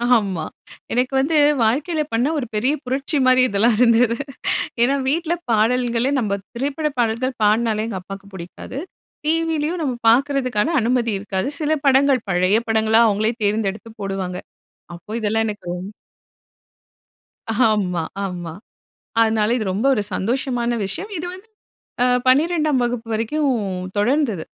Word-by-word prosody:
ஆமா. 190 -7 -1 0.5
எனக்கு 250 +2 0
வந்து 290 +4 +1 0.3
வாழ்க்கையில 295 +8 +1
பண்ண 235 +4 +2
ஒரு 270 - -2
பெரிய 250 +7 +2
புரட்சி 270 +4 -2
மாதிரி 255 0 +5
இதெல்லாம் 215 +3 +3
இருந்தது. 235 -1 +4 0.6
ஏன்னா 265 +4 +3
வீட்டில 330 +3 0 0.2
பாடல்களே 240 +3 +2
நம்ம 200 -4 -1 0.2
திரைப்பட 285 +5 -1
பாடல்கள் 240 +3 0
பாடினாலே 215 0 +2
எங்க 195 -4 -4
அப்பாக்கு 195 +2 -10
பிடிக்காது. 185 +8 -8 0.5
டிவிலேயும் 325 +1 0
நம்ம 265 -5 -1 0.2
பார்க்கறதுக்கான 270 +1 +2
அனுமதி 235 0 +1
இருக்காது. 195 +2 -2
சில 310 0 +1
படங்கள் 270 -2 +4
பழைய 185 +3 +3
படங்களா 220 0 +3
அவங்களே 215 +2 +1
தேர்ந்தெடுத்து 210 +1 -1
போடுவாங்க. 195 -2 -3 0.6
அப்போ 205 +5 -13
இதெல்லாம் 220 +1 +1
எனக்கு 210 -3 -6
ரொம் 180 +2 -6 1.8
ஆமா, 180 -6 0 0.2
ஆமா. 175 -3 -5 0.7
அதனால 220 0 +2
இது 215 - -3
ரொம்ப 210 +7 -1
ஒரு 210 - 0
சந்தோஷமான 240 +3 -1
விஷயம். 385 - -3
இது 325 - -4
வந்து 375 +4 -13 0.6
ஆ 250 - +4 0.2
12ஆம் 300 +1 +3
வகுப்பு 240 -1 -2
வரைக்கும் 230 +8 -1 0.5
தொடர்ந்தது. 225 - +1
235 Hz, 125 wpm, -21 LUFS, 210-270 Hz, 1.8 s, மாதிரி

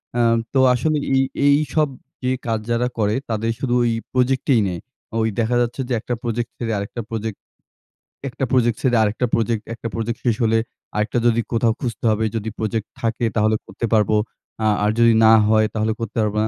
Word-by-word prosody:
অ্যা 120 - +2 0.3
তো 135 - +3
আসলে 155 +5 +1 0.2
এই 135 - +4 0.3
এই 145 0 +6 0.2
সব 155 -2 +3 0.4
যে 130 - +1 0.2
কাজ 115 -1 0
যারা 120 +1 +1
করে, 105 -1 +1
তাদের 115 +1 -1
শুধু 125 -3 -1
ওই 120 - +2 0.2
প্রজেক্টেই 130 -1 +2
নেয়। 90 -2 -4 0.4
ওই 110 - +2
দেখা 115 +2 +1
যাচ্ছে 120 +3 -2
যে - - 0
একটা 120 - -4
প্রোজেক্ট 120 0 -2
ছেড়ে 115 -2 -3
আরেকটা 100 +4 -4
প্রোজেক্ট 110 -2 -4 0.9
একটা 135 - -5
প্রজেক্ট 120 -3 +2
ছেড়ে 125 -3 +3
আরেকটা 110 +4 0
প্রজেক্ট। 115 -1 +1
একটা 115 - -6
প্রজেক্ট 115 +1 -3
শেষ 115 -3 +3
হলে 115 0 +3 0.4
আরেকটা 105 +3 0
যদি 115 0 +3
কোথাও 115 -1 +2
খুঁজতে 120 -2 -4
হবে 110 +1 0
যদি 110 0 -2
প্রজেক্ট 110 0 -2
থাকে, 115 0 0
তাহলে 110 0 +3
করতে 100 +5 -4
পারব। 105 -3 +3 0.6
আ - - +4 0.2
আর 105 - +3
যদি 115 -1 +6
না 110 - +7 0.2
হয়, 110 0 +4
তাহলে 110 0 0
করতে 115 0 -5
পারব 105 -1 -1
না। 110 - +1
115 Hz, 195 wpm, -21 LUFS, 110-120 Hz, 0.9 s, না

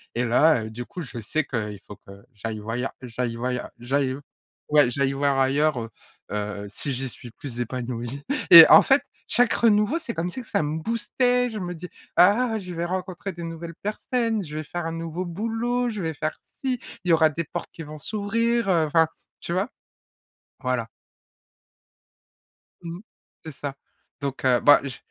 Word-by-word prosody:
et 120 - +1
là, 125 +2 +4
heu, - - -6
du 120 +3 -7
coup 185 -3 -7
je 130 -6 -6
sais 155 +9 0
qu'il 105 -6 -4
faut 105 - -10
que - - -12 0.2
j'aille 110 +1 -5
voyeur 115 +5 -3
j'aille 120 -1 -3
voyeur 125 +1 -3
j'aille 130 +2 0 0.5
ouais, 145 -4 +5
j'aille 140 +1 0
voir 140 0 +1
ailleurs, 140 +1 +2
heu 115 -1 -5 0.4
heu, 105 0 -3
si 135 +7 -3
j'y 130 +1 -3
suis 120 0 -11
plus 120 0 -8
épanouie. 120 +1 -4 0.3
Et 165 -1 +14
en - - +10
fait 275 +1 +4 0.3
chaque 245 -1 +4
renouveau 220 +6 +3
c'est 255 -8 -6
comme 175 +2 -2
si 255 - -5
que 240 - -14
ça - - +1
me 150 +2 -2
boostait, 245 +4 +1
je 215 - -5
me 180 -2 -4
dis: 175 +2 -8 0.3
«Ah 220 +6 +5
je 185 -4 -7
vais 170 0 -2
rencontrer 185 +1 -4
des 170 -1 -8
nouvelles 165 0 -7
personnes, 225 +2 -1
je 150 -3 -8
vais 155 - -3
faire 175 +2 -4
un - - -3
nouveau 165 +2 -4
boulot, 230 +7 -1
je 210 -3 -4
vais 160 -2 -2
faire 155 +2 -2
ci, 255 -2 -4 0.2
il 180 - -3
y - - +6
aura 160 -1 +5
des 160 +2 -3
portes 150 - -6
qui 165 - -8
vont 150 0 -9
s'ouvrir», 230 +5 0
heu, 170 -4 +3
enfin 160 +1 +4 0.3
tu 170 - -4
vois? 190 +6 0 0.9
Voilà. 125 -4 -1 1.9
Mmh, 170 +1 -7 0.5
c'est 160 - -6
ça. 140 -1 -5 0.5
Donc, 140 -1 -4
heu, 125 -2 +4
bah 145 - +7
je 135 -2 -6
160 Hz, 185 wpm, -25 LUFS, 130-195 Hz, 1.9 s, Et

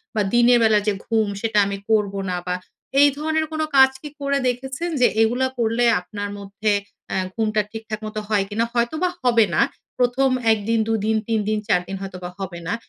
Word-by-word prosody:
বা, 215 - +2
দিনের 240 0 +5
বেলা 220 -1 +5
যে 210 - +3
ঘুম, 220 -2 +1
সেটা 225 -2 -1
আমি 200 0 -3
করবো 205 -3 +1
না 180 - -1
বা, 180 - 0 0.5
এই 290 - +7
ধরনের 315 +1 0
কোন 315 0 -2 0.2
কাজ 265 0 +8
কি 300 - -7
করে 280 0 +1
দেখেছেন? 265 +7 -3
যে 245 - +7
এগুলা 245 +4 +2
করলে 235 +1 +1 0.2
আপনার 205 +2 -6
মধ্যে 200 +2 -2 0.4
অ্যা - - -2 0.2
ঘুমটা 215 -1 +1
ঠিকঠাক 220 -1 -6
মতো 215 0 -4
হয় 210 -2 +2
কি 205 - -7
না? 230 - +3
হয়তোবা 275 +10 0
হবে 235 -3 +4
না। - - +4 0.4
১ম 250 +2 +2 0.2
১ 220 - +2
দিন, 230 0 +2
২ 225 - +1
দিন, 220 - +2
৩ 225 -1 +1
দিন, 215 - +1
৪ 180 -4 +3
দিন 195 - -4
হয়তোবা 180 -2 -6
হবে 185 -3 -5
না। - - 0
225 Hz, 205 wpm, -22 LUFS, 210-245 Hz, 0.5 s, কাজ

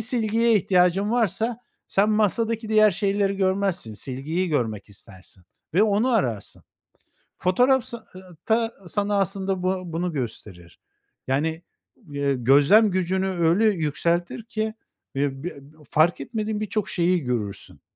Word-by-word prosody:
silgiye 225 0 +1
ihtiyacın 185 +1 +2
varsa 230 0 0 0.3
sen 205 +2 +2
masadaki 220 +1 0
diğer 215 -1 +5
şeyleri 200 -1 0
görmezsin, 190 - 0
silgiyi 140 - -3
görmek 110 -9 -2
istersin 95 -2 -12 0.3
ve 200 - +5
onu 215 +4 +2
ararsın. 120 - -1 0.8
Fotoğraf 250 +7 +3
sa 235 -2 -7
ııı, 185 -3 -13
ta 225 +1 +1 0.2
sana 205 +3 0
aslında 195 -1 -1
bu 185 0 -1
bunu 170 +1 -2
gösterir. 105 - -7 0.5
Yani, 160 +5 -1 0.5
ııı, 140 -1 -1
gözlem 145 - +5
gücünü 185 +1 0
öyle 175 +3 +2
yükseltir 170 +1 0
ki, 220 -1 -3 0.4
eee, 135 +1 -2
b 175 - -2 0.4
fark 155 0 +3
etmediğin 215 +7 -3
birçok 215 -1 -2
şeyi 175 0 +1
görürsün, 110 -5 -4
185 Hz, 125 wpm, -24 LUFS, 150-215 Hz, 0.8 s, diğer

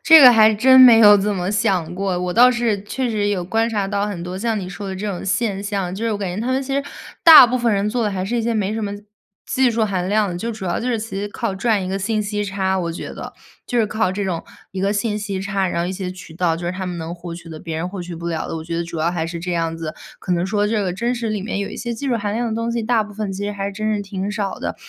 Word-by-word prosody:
这 320 -1 +9
个 250 -2 +10
还 220 -1 +6
真 260 +4 +6
没 240 -3 +9
有 205 -2 +8
怎 205 +1 0
么 180 0 -2
想 195 -6 0
过， 190 -1 -1
我 180 -1 -2
倒 250 +2 +7
是 235 -5 0
确 250 +4 -3
实 205 -2 0
有 185 -4 -1
观 225 +5 0
察 205 -4 -1
到 200 +1 -1
很 185 -5 -5
多 180 +1 -5
像 225 0 -1
你 180 -2 -5
说 195 +1 -7
的 190 - -5
这 210 +2 -4
种 195 -3 -4
现 200 0 -1
象。 195 -3 -3
就 220 +4 -4
是 225 - 0
我 205 - -3
感 185 -3 -3
觉 210 - -3
他 255 +3 -1
们 265 +1 0
其 270 +1 -3
实 280 - +1 0.4
大 320 -7 +11
部 250 +2 -1
分 235 -2 +1
人 200 +1 +1
做 235 +1 -1
的 210 - 0
还 190 -1 -3
是 235 +5 -2
一 230 - 0
些 235 +1 0
没 210 -1 0
什 225 - -3
么 200 -1 -3 0.5
技 260 -2 +2
术 225 -1 +1
含 185 -3 -2
量， 205 -4 +1
就 230 +4 -3
主 215 -3 -8
要 175 - -1
就 245 - -3
是 235 - +1
其 215 -2 -5
实 205 - -2
靠 230 -1 -3
赚 205 -1 0
一 - - -4
个 195 +1 -2
信 215 +2 -1
息 205 0 -2
差， 190 -1 -1
我 170 -2 -2
觉 - - -7
得。 - - -8 0.3
就 245 - -1
是 220 - +3
靠 215 -3 0
这 200 +1 -3
种 170 -3 -2 0.3
一 190 - -4
个 200 +1 +1
信 210 +1 -1
息 200 -2 -4
差， 195 -1 -1
然 170 - -2
后 175 - -1
一 185 - -3
些 185 -1 -4
渠 180 -3 -11
道 170 -2 +1
就 170 +1 -5
是 175 - -1
他 190 0 -5
们 175 -1 -4
能 165 +1 -5
获 175 -1 -8
取 170 0 -10
的， 160 - -8
别 160 -1 -5
人 175 +3 -3
获 185 -2 -6
取 175 -1 -7
不 170 +1 -7
了 165 -2 -3
的。 - - -4
我 160 - -6
觉 165 0 -4
得 170 - -1
主 165 -1 -6
要 160 +2 +1
还 160 -2 -2
是 170 0 -5
这 180 +1 -4
样 165 -1 -1
子， 155 -1 -5 0.2
可 185 - -3
能 175 0 +1
说 205 +1 0
这 215 -1 0
个 180 -2 -1
真 235 +6 -1
实 235 -2 -3
里 210 -2 -2
面 200 0 -3
有 200 - -3
一 - - -8
些 235 -1 -4
技 275 +3 -4
术 240 - +1
含 205 -1 -3
量 235 0 -1
的 - - -3
东 230 +1 -2
西， 235 -1 -1
大 225 -1 +1
部 210 - -12
分 210 -2 -3
其 200 +2 -4
实 205 - -2
还 200 0 -3
真 215 +2 -2
是 205 - -2
挺 195 0 -4
少 205 -2 -3
的。 - - -4
200 Hz, 345 characters per minute, -20 LUFS, 180-225 Hz, 0.5 s, 大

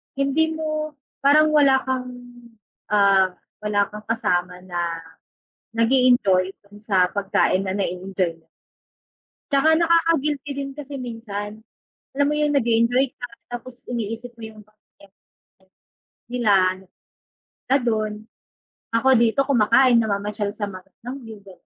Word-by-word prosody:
hindi 310 +4 +1
mo, 310 -1 -3 0.2
parang 305 +2 +5
wala 275 -3 +4
kang, 260 -1 -2 0.8
ah, 195 -3 +3 0.2
wala 210 -1 -1
kang 210 0 -10
kasama 180 -5 -1
na 175 -2 -5 1.0
nag-e-enjoy 230 -6 +3 0.2
dun 205 +1 -16
sa 190 -4 +1
pagkain 195 -1 +1
na 190 - -2
na-e-enjoy 180 -2 -2
mo. - - -35 1.0
'Tsaka, 280 +3 +3
nakaka-guilty 325 -4 +2
din 275 0 -5
kasi 290 -1 -8
minsan, 220 -2 -7 0.5
alam 285 0 +3
mo 295 - +1
yung 300 -1 +1
nag-e-enjoy 240 +2 +2
ka, 245 - -8 0.2
tapos 245 +1 -8
iniisip 230 +1 -4
mo - - -10
yung 215 -1 -14
pamilya 215 0 -35 0.2
mo, - - -84 0.4
like 190 0 -33 0.5
nila, 240 -4 +2 1.1
na 270 - +3
dun. 215 -2 -1 0.7
Ako 230 +3 +1
dito 235 +4 +3
kumakain 240 -1 +4
namamasyal 205 0 -2
sa 205 - -3
magandang 200 +7 -9
view, 225 -2 -10
ganyan. 190 -2 -14
230 Hz, 125 wpm, -22 LUFS, 205-270 Hz, 1.1 s, parang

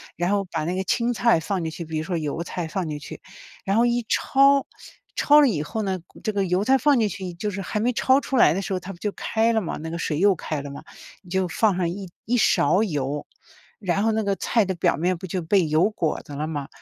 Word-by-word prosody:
然 175 +3 -1
后 200 -1 +1
把 160 -2 -2
那 175 - -1
个 190 - -1
青 235 +6 +1
菜 235 -6 +3
放 185 +3 -2
进 160 - -2
去。 170 +1 -7
比 160 0 -4
如 155 - -2
说 175 +1 -2
油 155 +1 -3
菜 175 0 -4
放 175 +2 -3
进 150 - -3
去， 145 - -10 0.4
然 195 +2 +1
后 235 - +4
一 240 0 +1
抄， 275 0 +4 0.5
抄 295 +1 +6
了 285 - +5
以 165 -10 -1
后 220 +8 -4
呢， 190 -2 -2 0.2
这 215 - 0
个 200 -1 0
油 180 +2 +1
菜 265 +5 +4
放 285 +2 +3
进 220 - +2
去 185 -3 -6
就 205 +5 -3
是 195 0 -4
还 205 +3 -3
没 240 +4 +1
抄 260 +3 +3
出 270 - -2
来 155 - +6
的 190 - -2
时 195 - -6
候， 185 - -1
它 180 +2 -8
不 - - -14
就 210 - -2
开 225 +3 0
了 220 - +2
吗， 175 - -4
那 160 - -5
个 170 - -4
水 150 -2 -1
又 200 +2 +5
开 155 -3 -4
了 140 0 -7
吗， 140 - -9 0.4
你 185 - -18
就 190 0 0
放 205 +3 +1
上 180 -2 +1
一 190 +1 -6 0.2
一 245 +3 +1
勺 210 -2 +3
油。 145 -6 -3 0.5
然 195 -1 0
后 225 - +3
那 220 0 0
个 200 -1 0
菜 225 -3 +1
的 190 - -2
表 175 - +1
面 180 +3 0
不 185 - -8
就 185 +1 -3
被 175 +1 +2
油 155 +7 +2
裹 165 -7 -1
着 145 - -9
了 150 +2 -3
吗， 145 -3 -4
190 Hz, 290 characters per minute, -24 LUFS, 165-220 Hz, 0.5 s, 抄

